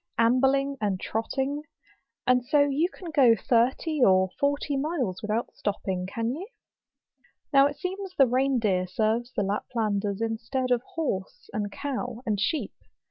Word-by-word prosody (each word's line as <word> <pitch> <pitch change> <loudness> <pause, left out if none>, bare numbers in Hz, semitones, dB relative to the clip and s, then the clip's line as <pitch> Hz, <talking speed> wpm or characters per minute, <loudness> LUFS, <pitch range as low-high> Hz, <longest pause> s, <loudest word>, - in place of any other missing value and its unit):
Ambling 270 +4 +3
and 200 -3 0
trotting. 265 +8 -2 0.6
And 250 -1 +3
so 290 +4 +3
you 285 +5 +2
can 360 -3 -9
go 260 -7 +6
thirty 260 - +1
or 190 -3 +5
forty 285 0 0
miles 270 - -1
without 215 +2 -2
stopping, 190 -3 -3
can 230 +4 -2
you? 355 +8 -6 1.1
Now 275 0 +7
it 285 - -6
seems 380 0 -5
the 270 - +7
rein 260 +2 +2
deer 190 -5 +1
serves 220 +5 0
the 205 - +1
Lap¬ 200 +2 -1
landers 205 -3 0
instead 230 +3 -2
of 245 -1 +3
horse, 230 - -3
and 205 -1 -2
cow, 250 -2 -4
and 210 -3 0
sheep. 295 - -1
245 Hz, 150 wpm, -27 LUFS, 210-280 Hz, 1.1 s, Now